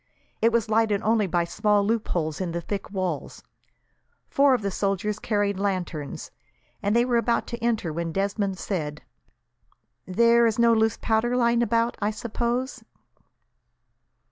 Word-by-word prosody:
It 230 - +4
was 230 -2 +1
lighted 215 -2 +1
only 220 -2 +2
by 175 0 +1
small 210 +3 +1
loopholes 180 -8 -1
in 175 -3 -3
the 170 - -2
thick 200 +3 -5
walls. 185 -6 -4 0.9
Four 280 -1 +5
of 230 - -4
the 200 - -1
soldiers 200 +2 -1
carried 205 -3 0
lanterns, 180 -7 -3 0.5
and 205 +2 0
they 235 +1 +4
were 245 -2 +1
about 235 0 +1
to 235 - -5
enter, 220 -9 0
when 170 +1 -3
Desmond 195 +1 -1
said: 150 -7 -4 1.0
"There 235 +4 +4
is 220 - -1
no 235 -1 +5
loose 220 0 +2
powder 230 +3 +1
lying 235 -1 +3
about, 230 0 +1
I 205 - +1
suppose?" 235 +4 -3
210 Hz, 145 wpm, -25 LUFS, 190-235 Hz, 1.0 s, Four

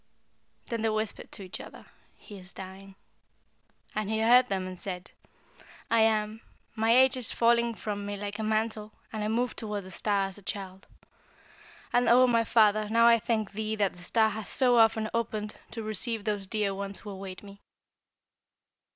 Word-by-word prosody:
Then 230 -2 -3
they 225 - +2
whispered 215 -1 -3
to 200 - -8
each 185 - -7
other, - - -12 0.3
'He 205 -3 -11
is 185 +1 -11
dying,' 190 +1 -10 1.0
and 215 -1 -2
he 220 0 0
heard 245 +3 +6
them, 190 -1 -2
and 185 -1 -7
said: 180 -2 -6 0.8
'I 230 - +4
am. 220 0 +2 0.3
My 225 0 +1
age 260 0 +5
is 250 - -2
falling 235 0 +2
from 205 -2 -4
me 205 0 -4
like 205 +1 -5
a - - -2
mantle, 215 0 -1 0.2
and 215 -1 -3
I - - -1
move 235 +2 0
toward 210 -2 -4
the 185 - -11
star 200 +2 +1
as 195 +1 -7
a - - -16
child. 190 -1 -7 1.1
And, 245 0 +3
O 250 +2 +7
my 230 -2 +3
Father, 215 -2 +3
now 230 +1 +4
I 235 0 +6
thank 220 -3 -1
thee 215 +1 -3
that 205 -3 +1
the 180 - -14
star 220 +4 +2
has 215 0 -5
so 250 -2 +3
often 225 -1 +4
opened 215 -2 -2
to 225 - -6
receive 215 +1 -2
those 205 -2 -2
dear 205 -1 0
ones 200 0 -4
who 210 - -9
await 190 -1 -8
me!' 200 0 -13
215 Hz, 185 wpm, -28 LUFS, 200-225 Hz, 1.1 s, O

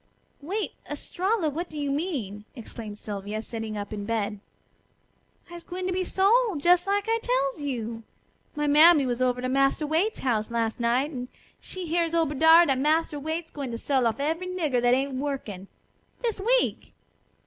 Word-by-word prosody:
"Wait, 395 +9 -3 0.2
Estralla! 365 +6 -1
What 330 +4 -3
do 310 - -9
you 285 -1 -1
mean?" 275 - -3
exclaimed 220 -3 -8
Sylvia, 205 0 -5
sitting 225 -1 -5
up 205 +1 -5
in 205 -1 -4
bed. 210 -1 -2 1.1
"I'se 345 0 -9
gwine 365 +1 -5
to 370 - -1
be 370 +1 0
sold! 395 -3 +2
Jes' 355 +1 +5
like 405 +1 +1
I 455 0 +2
tells 300 - 0
you. 235 -5 -4 0.5
My 295 0 -1
mammy 300 0 +7
was 245 0 -2
over 250 -1 +1
to - - 0
Massa 275 +3 +2
Waite's 330 +9 0
house 220 -5 0
las' 230 -1 -1
night, 245 +5 +1
and 250 -3 -5 0.3
she 370 -1 -7
hears 335 0 0
ober 325 -3 +1
dar 320 +4 +7
dat 270 -4 +1
Massa 305 +1 +1
Robert's 320 +3 -4
gwine 280 -3 -5
to 230 - -4
sell 260 0 +1
off 230 - -2
every 325 +5 -1
nigger 315 -9 0
what 245 - +4
ain't 270 +2 +1
workin' 245 -9 -4 0.6
this 460 -4 -1
week!" - - +1
290 Hz, 175 wpm, -26 LUFS, 235-345 Hz, 1.1 s, mammy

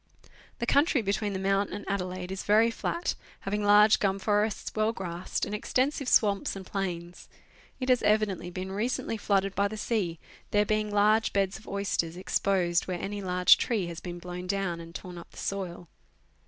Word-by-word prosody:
The 235 - -2
country 280 -1 +3
between 200 +1 -1
the - - -2
Mount 195 +1 +1
.and 205 - -6
Adelaide 185 -2 -3
is 190 - -3
very 220 +3 +4
flat, 340 +8 -2 0.3
having 205 +1 -2
large 210 +1 +6
gum 195 -1 +1
forests, 210 +1 0
well 215 0 +2
grassed, 180 -4 -3
and - - -6
extensive 255 +5 0
swamps 200 -3 +3
and 195 -1 -7
plains. 175 -3 -5 0.5
It 255 - -3
has 250 -1 +4
evidently 210 -4 +1
been 185 +1 -5
recently 225 +3 -1
flooded 195 -2 +1
by 200 +1 +2
the 215 +1 -7
sea, 205 -7 -1 0.3
there 210 0 +3
being 215 0 0
large 210 +2 +3
beds 195 0 0
of 220 - -18
oysters 185 -4 -2
exposed 180 -2 +1
where 180 -2 -3
any 205 +1 -4
large 180 -1 +5
tree 220 -6 0
has 170 -1 -6
been 175 -1 -7
blown 180 +1 -7
down 195 -3 -1
and 165 0 -11
torn 180 -1 -7
up 170 - -12
the - - -18
soil. 180 -3 -4
200 Hz, 180 wpm, -28 LUFS, 180-210 Hz, 0.5 s, large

